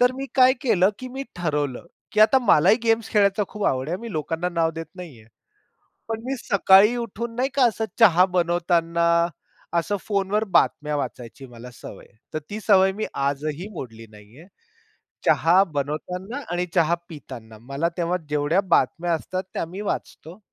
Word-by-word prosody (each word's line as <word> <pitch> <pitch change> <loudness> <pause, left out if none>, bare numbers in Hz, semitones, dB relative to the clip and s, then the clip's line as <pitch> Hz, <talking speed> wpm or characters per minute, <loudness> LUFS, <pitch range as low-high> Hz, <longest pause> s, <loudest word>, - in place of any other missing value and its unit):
तर 250 +1 +4
मी 270 +1 -4
काय 255 -1 +6
केलं 205 -7 +3
की 255 - -7
मी 270 - -4
ठरवलं, 150 -5 -2 0.3
की 210 - +1
आता 225 +5 +6
मलाही 195 -2 +5
गेम्स 225 -1 +1
खेळायचा 200 -1 +3
खूप 210 -1 -5
आवड 130 +1 0
आहे, 175 - -1
मी 230 0 -8
लोकांना 165 +2 -2
नाव 165 -2 0
देत 165 0 -6
नाहीये. 145 - -11 0.8
पण 225 0 -4
मी 270 +1 -2
सकाळी 200 +3 +5
उठून 235 0 -5
नाही 255 +3 0
का, 275 - +4
असं 225 -1 -2
चहा 180 -5 +6
बनवताना, 170 -2 0 0.8
असं 205 +5 -2
फोनवर 205 0 0
बातम्या 150 0 +2
वाचायची 130 -1 -6
मला 120 0 -12
सवय - - -11
आहे. 105 - -31 0.2
तर 155 - -1
ती 210 - -5
सवय 190 -2 +4
मी 215 +2 -3 0.2
आजही 150 +5 -3
मोडली 115 -8 -9
नाहीये. 105 +9 -16 0.8
चहा 180 +4 +4
बनवताना 180 - -4
आणि 175 +1 -1
चहा 170 -1 +3
पिताना, 120 -8 -11
मला 140 +7 -2
तेव्हा 175 +1 0
जेवढ्या 150 +5 +1
बातम्या 170 0 +1
असतात, 185 +3 -3
त्या - - -2
मी 180 +5 -8
वाचतो 170 +6 -8
175 Hz, 165 wpm, -23 LUFS, 150-210 Hz, 0.8 s, काय